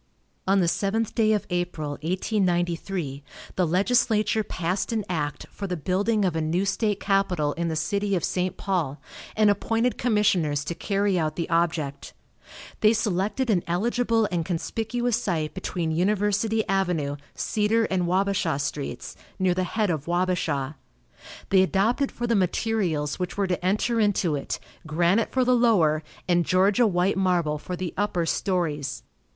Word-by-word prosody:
On 195 0 +4
the 175 - +2
seventh 210 +5 0
day 220 -2 +3
of 210 -2 +1
April, 175 -4 -2
1893, 175 -4 -1 0.3
the 180 -2 +2
legislature 215 +4 +2
passed 185 +1 -2
an 220 -3 -1
act 150 -5 -3
for 200 - -5
the 180 -1 -3
building 200 +6 +1
of 175 -3 0
a 160 - 0
new 170 +5 0
state 205 +1 0
capitol 180 -7 +1
in 170 0 -2
the 160 - -1
city 200 +5 0
of 175 - -1
St. 185 0 -1
Paul, 165 -8 -1 0.4
and 215 -1 +5
appointed 225 +4 0
commissioners 185 - +2
to 170 - -3
carry 195 +1 0
out 155 -1 -1
the 170 - -2
object. 160 -4 -1 0.6
They 215 +1 +5
selected 215 +3 0
an 180 -4 +2
eligible 225 +4 +1
and 170 -2 0
conspicuous 230 +7 -1
site 160 -7 -1
between 175 -3 -3
University 205 +5 +1
avenue, 175 -7 0 0.2
Cedar 220 +2 +1
and 185 -4 0
Wabasha 190 -3 +1
streets, 145 0 -4 0.2
near 185 -2 +2
the 185 +1 0
head 210 0 0
of 155 -2 -3
Wabasha. 170 -5 -1 0.7
They 190 -1 +6
adopted 215 +9 +1
for 240 - -4
the 235 - +1
materials 180 -6 0
which 180 +1 -3
were 200 - +2
to 180 -1 -2
enter 210 +5 +1
into 200 -6 +2
it 140 - -4 0.3
granite 175 +7 +2
for 255 -1 +2
the 250 - +4
lower 185 -11 +3 0.3
and 175 -1 +3
Georgia 195 +7 +3
white 185 0 +1
marble 175 -5 +1
for 180 - -5
the 180 -2 -4
upper 185 -4 0
stories. 155 -7 -1
185 Hz, 155 wpm, -25 LUFS, 170-210 Hz, 0.7 s, They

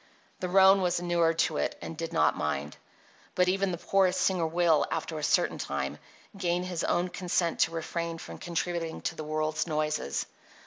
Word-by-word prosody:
The 180 - -3
roan 190 +1 +6
was 175 -1 +1
inured 170 -2 +1
to - - -3
it, - - -1
and 165 - -7
did 165 +1 -4
not 165 - +3
mind. 70 +2 -2 0.6
But 180 0 +3
even 195 +1 +1
the 175 - -3
poorest 190 +1 +2
singer 180 -4 +2
will, 165 -1 +3
after 160 -1 -3
a - - -7
certain - - +2
time, 70 -1 -3 0.4
gain 180 -2 0
his 180 -2 -3
own 175 +1 +1
consent 175 -2 -1
to - - +3
refrain 165 0 -3
from - - -9
contributing 170 -1 -3
to - - -3
the 155 - -6
world's 155 +1 -1
noises. 155 - -1
170 Hz, 180 wpm, -29 LUFS, 160-180 Hz, 0.6 s, roan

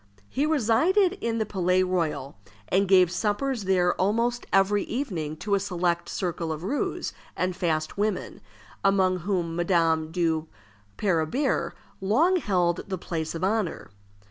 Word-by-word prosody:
He 285 +3 0
resided 315 - +3
in 230 -1 -1
the 220 - 0
Palais 185 -2 +1
Royal, 170 -7 -2 0.3
and 195 +1 +2
gave 185 -2 +5
suppers 215 +5 -1
there 180 -2 +3
almost 235 +5 0
every 195 +1 +3
evening 170 - -3
to 205 +5 -3
a 200 - +4
select 175 -3 -1
circle 170 -3 -2
of 155 0 -4
roués 265 +10 -2 0.2
and 185 0 -1
fast 160 0 -1
women, 210 0 -2 0.4
among 190 -2 +3
whom 175 -2 -2
Madame 165 -3 +1
de 165 -2 0 0.5
Parabère 195 - 0 0.3
long 295 - +3
held 180 - +1
the 190 -1 -3
place 165 -2 -4
of 165 - -4
honor. 200 - -1
185 Hz, 140 wpm, -26 LUFS, 170-215 Hz, 0.5 s, gave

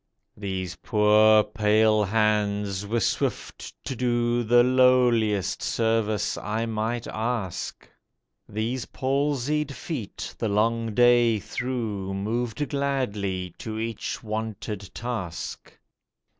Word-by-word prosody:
These 95 -4 -4
poor, 105 0 +5
pale 110 0 +3
hands 105 -1 0
were 115 +3 0
swift 105 - -2
to 130 - -3
do 120 0 +1
The 120 +1 +5
lowliest 125 -5 +3
service 110 -2 0
I 110 +2 -2
might 115 +1 -2
ask; 110 -4 -3 0.6
These 115 +4 -2
palsied 140 +2 0
feet 130 - -6
the 115 - 0
long 115 +1 +1
day 120 -1 +5
through 105 -4 -3
Moved 115 +7 -2
gladly 105 - -2
to 110 -1 -5
each 115 +1 -4
wonted 110 -2 -4
task. 110 -9 -5
110 Hz, 100 wpm, -26 LUFS, 105-120 Hz, 0.6 s, poor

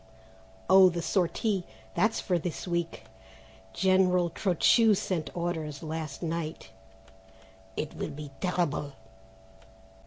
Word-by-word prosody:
"Oh, 190 0 +8
the 170 -1 -3
sortie, 190 +3 0 0.3
that's 220 +6 +2
for 180 -3 0
this 175 +2 -5
week. 170 -1 -2 0.7
General 180 - +3
Trochu 210 +5 +4
sent 180 -4 -2
orders 160 -4 -3
last 160 -1 -5
night." 160 -5 -4 1.1
"It 155 - -3
will - - -4
be 145 -1 -8
terrible." 165 -6 -1
170 Hz, 100 wpm, -29 LUFS, 160-185 Hz, 1.1 s, Oh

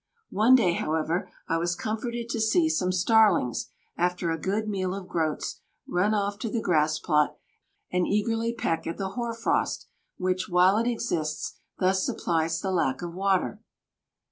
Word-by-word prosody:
One 225 +6 +5
day, 185 -9 +4
however, 165 +4 -1 0.2
I 165 - +1
was 175 +1 0
comforted 235 +4 -3
to 230 - -1
see 315 +9 +3
some 185 - +1
starlings, 195 - +3 0.3
after 180 -1 0
a 165 - -2
good 210 +3 -1
meal 190 -3 -1
of 195 -2 -7
groats, 160 -4 -2 0.3
run 200 +5 +1
off 200 0 -1
to 230 - -3
the 230 - -1
grass 155 -5 +2
plot 150 -3 +1 0.5
and 180 -1 +1
eagerly 225 +2 0
peck 165 -8 -2
at 165 - -4
the 195 -1 -2
hoar 235 +2 -3
frost, 230 - 0 0.3
which, 185 0 -1
while 180 +3 +5
it 230 - 0
exists, 165 -10 -2 0.2
thus 190 +1 +2
supplies 165 -1 0
the 190 - -2
lack 165 -5 0
of 170 -1 -5
water. 195 +2 0
185 Hz, 165 wpm, -27 LUFS, 170-220 Hz, 0.5 s, One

